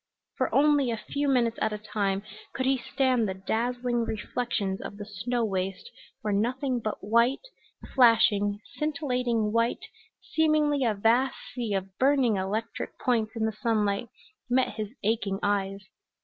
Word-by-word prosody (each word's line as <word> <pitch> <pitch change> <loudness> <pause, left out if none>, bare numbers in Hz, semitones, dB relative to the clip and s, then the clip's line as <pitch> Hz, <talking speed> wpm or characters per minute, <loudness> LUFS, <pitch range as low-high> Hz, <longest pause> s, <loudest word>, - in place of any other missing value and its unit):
For - - 0
only 290 -2 +4
a 230 - -1
few 285 +6 -2
minutes 240 -4 +2
at 220 - +1
a 210 - -3
time 200 -2 -2 0.3
could 260 - -1
he 265 0 +2
stand 250 -3 +1
the 190 - -3
dazzling 240 +4 -1
reflections 215 -3 -2
of 200 - -7
the 205 - -6
snow 225 +4 -2
waste 195 - -3 0.3
where 210 -1 0
nothing 250 +5 0
but 215 -2 -4
white, 235 - +2 0.5
flashing, 210 -5 +4 0.2
scintillating 250 -7 0
white, 230 +1 0 0.3
seemingly 305 -3 +2
a 220 -3 +1
vast 235 +6 +3 0.2
sea 235 -5 -2
of 190 0 -5
burning 265 -4 +4
electric 205 +4 -3
points 225 -4 0
in 225 -1 0
the 220 - 0
sunlight, 215 0 +1 0.4
met 255 +1 +3
his 215 -1 -4
aching 205 -2 0
eyes. 195 -1 0
230 Hz, 150 wpm, -27 LUFS, 205-255 Hz, 0.5 s, only